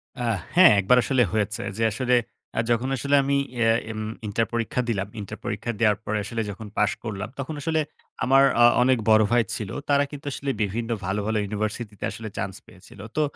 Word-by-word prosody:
আ 125 Hz, -, -7 dB, 0.3 s
হ্যাঁ, 185 Hz, -6 st, +9 dB
১ -, -, +1 dB
বার 125 Hz, -, +7 dB
আসলে 130 Hz, -3 st, +3 dB
হয়েছে। 110 Hz, 0 st, 0 dB, 0.2 s
যে 115 Hz, -, 0 dB
আসলে 125 Hz, +3 st, +1 dB, 0.4 s
আ -, -, +3 dB
যখন 120 Hz, +3 st, +1 dB
আসলে 140 Hz, +2 st, +1 dB
আমি 140 Hz, 0 st, +1 dB, 0.2 s
ইয়ে 115 Hz, -1 st, +4 dB, 0.2 s
এম 110 Hz, -1 st, -5 dB, 0.3 s
ইন্টার 110 Hz, +3 st, 0 dB
পরীক্ষা 115 Hz, +2 st, -1 dB
দিলাম। 100 Hz, -3 st, -1 dB
ইন্টার 100 Hz, -, -7 dB
পরীক্ষা 120 Hz, -, -2 dB
দেওয়ার 105 Hz, -3 st, +3 dB
পর 110 Hz, -, -3 dB
আসলে 115 Hz, +3 st, -3 dB
যখন 105 Hz, +2 st, -7 dB
পাশ 105 Hz, 0 st, +3 dB
করলাম, 105 Hz, -2 st, -4 dB
তখন 140 Hz, +3 st, -4 dB
আসলে 160 Hz, +2 st, 0 dB, 0.4 s
আমার 135 Hz, +1 st, +5 dB, 0.2 s
আ -, -, +9 dB, 0.2 s
অনেক 130 Hz, 0 st, +4 dB
বড় 110 Hz, 0 st, +6 dB
ভাই 120 Hz, 0 st, +4 dB
ছিল। 105 Hz, -4 st, -4 dB, 0.2 s
তারা 140 Hz, 0 st, +4 dB
কিন্তু 145 Hz, -1 st, -9 dB
আসলে 140 Hz, -, -4 dB
বিভিন্ন 115 Hz, +4 st, -3 dB, 0.2 s
ভালো, 100 Hz, +3 st, -1 dB
ভালো 110 Hz, 0 st, 0 dB
ইউনিভার্সিটি 105 Hz, +2 st, -3 dB
তে -, -, -2 dB
আসলে 110 Hz, +2 st, -7 dB
চান্স 95 Hz, -1 st, -3 dB
পেয়েছিল। 95 Hz, +2 st, -16 dB, 0.2 s
তো 155 Hz, -, +2 dB
115 Hz, 200 wpm, -24 LUFS, 105-130 Hz, 0.4 s, হ্যাঁ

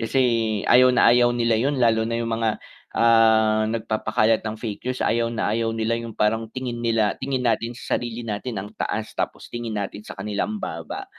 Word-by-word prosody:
kasi 125 Hz, +4 st, 0 dB, 0.5 s
ayaw 125 Hz, +1 st, +6 dB
na 125 Hz, -, +4 dB
ayaw 120 Hz, 0 st, +4 dB
nila 115 Hz, -1 st, +2 dB
yun 140 Hz, +3 st, 0 dB
lalo 115 Hz, -2 st, +3 dB
na 115 Hz, -, -1 dB
yung 115 Hz, -1 st, -2 dB
mga, 115 Hz, -1 st, 0 dB, 0.4 s
ah, 110 Hz, -2 st, +4 dB
nagpapakalat 110 Hz, 0 st, +1 dB
ng 110 Hz, 0 st, -4 dB
fake 105 Hz, -3 st, -5 dB
news, 130 Hz, -, -4 dB
ayaw 115 Hz, 0 st, +1 dB
na 110 Hz, -2 st, -1 dB
ayaw 115 Hz, 0 st, 0 dB
nila 110 Hz, +1 st, 0 dB
yung 115 Hz, -1 st, -8 dB
parang 110 Hz, +1 st, +1 dB
tingin 125 Hz, -2 st, -5 dB
nila 115 Hz, -3 st, +1 dB
tingin 130 Hz, -1 st, -2 dB
natin 115 Hz, 0 st, 0 dB
sa -, -, -2 dB
sarili 120 Hz, -1 st, -6 dB
natin 110 Hz, +1 st, -4 dB
ang 100 Hz, +2 st, -6 dB
taas, -, -, -3 dB
tapos -, -, -4 dB
tingin 115 Hz, -2 st, -4 dB
natin 100 Hz, 0 st, -5 dB
sa -, -, -10 dB
kanila 105 Hz, -, -2 dB
ang 215 Hz, -, -3 dB
baba, 395 Hz, -, -6 dB
115 Hz, 200 wpm, -23 LUFS, 110-120 Hz, 0.5 s, ayaw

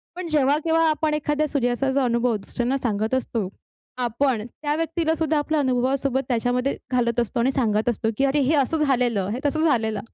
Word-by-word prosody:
पण 360 Hz, -1 st, -5 dB
जेव्हा 290 Hz, -2 st, +2 dB
केव्हा 325 Hz, 0 st, +3 dB
आपण 310 Hz, 0 st, 0 dB
एखाद्या 300 Hz, 0 st, 0 dB
सूर्यास्ताचा 265 Hz, 0 st, 0 dB
अनुभव 235 Hz, -1 st, +1 dB
दुसऱ्यांना 240 Hz, +5 st, -2 dB
सांगत 220 Hz, -2 st, -2 dB
असतो, 235 Hz, -5 st, -1 dB, 0.5 s
आपण 240 Hz, -1 st, 0 dB
त्या 295 Hz, +4 st, -3 dB
व्यक्तीला 325 Hz, 0 st, 0 dB
सुद्धा 315 Hz, -1 st, 0 dB
आपल्या 305 Hz, +1 st, 0 dB
अनुभवासोबत 265 Hz, 0 st, +1 dB
त्याच्यामध्ये 250 Hz, +2 st, 0 dB, 0.2 s
घालत 240 Hz, -2 st, +1 dB
असतो 235 Hz, +1 st, -1 dB
आणि 250 Hz, +3 st, +2 dB
सांगत 225 Hz, -4 st, +1 dB
असतो, 225 Hz, -1 st, -1 dB
की 275 Hz, -, +2 dB
अरे, 275 Hz, +2 st, +2 dB
हे 275 Hz, +3 st, +2 dB
असं 300 Hz, +2 st, +1 dB
झालेलं. 245 Hz, -8 st, +1 dB
हे 245 Hz, -, -3 dB
तसं 310 Hz, +2 st, +1 dB
झालेलं. 220 Hz, -5 st, 0 dB
260 Hz, 180 wpm, -23 LUFS, 240-295 Hz, 0.5 s, केव्हा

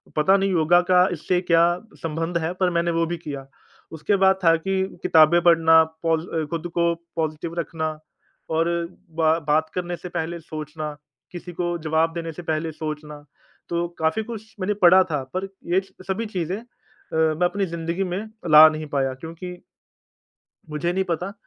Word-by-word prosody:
पता 190 Hz, +6 st, +4 dB
नहीं 195 Hz, 0 st, 0 dB
योगा 175 Hz, 0 st, +4 dB
का 180 Hz, 0 st, +6 dB
इससे 175 Hz, +2 st, 0 dB
क्या 170 Hz, -2 st, +4 dB, 0.4 s
संबंध 165 Hz, +2 st, -2 dB
है, 165 Hz, +2 st, -2 dB
पर 185 Hz, 0 st, +1 dB
मैंने 170 Hz, 0 st, 0 dB
वो 165 Hz, 0 st, +1 dB
भी 170 Hz, +1 st, -3 dB
किया। 145 Hz, -4 st, -7 dB, 0.5 s
उसके 160 Hz, +5 st, 0 dB
बाद 190 Hz, 0 st, +6 dB
था 165 Hz, 0 st, +6 dB
कि 190 Hz, +3 st, -1 dB, 0.2 s
किताबें 160 Hz, +1 st, +5 dB
पढ़ना, 160 Hz, -1 st, +6 dB, 0.2 s
पॉज़ 165 Hz, +1 st, +1 dB
अ, 160 Hz, -1 st, -2 dB
ख़ुद 165 Hz, +1 st, -3 dB
को 170 Hz, -1 st, +2 dB, 0.2 s
पॉज़िटिव 160 Hz, +1 st, -3 dB
रखना 160 Hz, -2 st, -3 dB, 0.5 s
और 165 Hz, +1 st, +1 dB, 0.5 s
ब 160 Hz, 0 st, +3 dB
बात 155 Hz, +1 st, +2 dB
करने 175 Hz, -1 st, -2 dB
से 180 Hz, -, -8 dB
पहले 170 Hz, 0 st, -3 dB
सोचना, 155 Hz, -1 st, -6 dB, 0.4 s
किसी 175 Hz, 0 st, -8 dB
को 175 Hz, 0 st, -2 dB
जवाब 160 Hz, +1 st, +2 dB
देने 165 Hz, -1 st, -4 dB
से 175 Hz, -, -9 dB
पहले 160 Hz, 0 st, -2 dB
सोचना 150 Hz, -1 st, -7 dB, 0.4 s
तो 170 Hz, 0 st, -1 dB
काफ़ी 160 Hz, +8 st, +1 dB
कुछ 220 Hz, -1 st, -9 dB
मैंने 205 Hz, +2 st, 0 dB
पढ़ा 185 Hz, +1 st, +7 dB
था 150 Hz, -6 st, -3 dB
पर 190 Hz, +1 st, -2 dB, 0.3 s
ये 190 Hz, -, +5 dB, 0.3 s
सभी 195 Hz, +4 st, -2 dB
चीज़ें 185 Hz, -3 st, -3 dB
अ, -, -, -14 dB, 0.5 s
मैं 160 Hz, +2 st, +2 dB
अपनी 195 Hz, +2 st, 0 dB
ज़िंदगी 170 Hz, +2 st, -3 dB
में 180 Hz, 0 st, -3 dB, 0.3 s
ला 155 Hz, +1 st, +11 dB
नहीं 155 Hz, 0 st, -5 dB
पाया 135 Hz, -1 st, +1 dB
क्योंकि 165 Hz, +6 st, -8 dB, 1.1 s
मुझे 150 Hz, +3 st, -1 dB
नहीं 190 Hz, 0 st, +1 dB
पता 180 Hz, +2 st, -3 dB
165 Hz, 170 wpm, -23 LUFS, 160-180 Hz, 1.1 s, ला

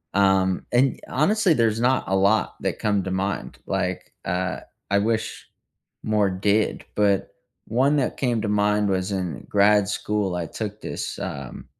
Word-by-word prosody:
um, 95 Hz, -1 st, +3 dB
and, 130 Hz, +2 st, +3 dB
honestly, 185 Hz, +6 st, +3 dB
there's 115 Hz, -4 st, +2 dB
not 130 Hz, +2 st, +2 dB
a 95 Hz, -, +1 dB
lot 100 Hz, +3 st, +2 dB
that -, -, -2 dB
come 105 Hz, -2 st, +1 dB
to 95 Hz, -, -4 dB
mind, 95 Hz, +1 st, -3 dB
like, -, -, -2 dB
uh, 90 Hz, +1 st, -2 dB, 0.3 s
I 100 Hz, -, +3 dB
wish 110 Hz, +2 st, -2 dB, 0.6 s
more 105 Hz, -2 st, +2 dB
did, 100 Hz, +3 st, 0 dB
but 100 Hz, -2 st, +2 dB, 0.4 s
one 135 Hz, +6 st, +2 dB
that 135 Hz, -, -1 dB
came 120 Hz, -4 st, 0 dB
to -, -, -2 dB
mind 105 Hz, 0 st, +2 dB
was 95 Hz, +1 st, -1 dB
in 90 Hz, -8 st, -3 dB
grad 105 Hz, 0 st, +4 dB
school, 105 Hz, -2 st, -1 dB
I 85 Hz, -2 st, -3 dB
took 105 Hz, +4 st, -6 dB
this, -, -, -5 dB
um, 70 Hz, -2 st, -6 dB
105 Hz, 160 wpm, -24 LUFS, 95-110 Hz, 0.6 s, grad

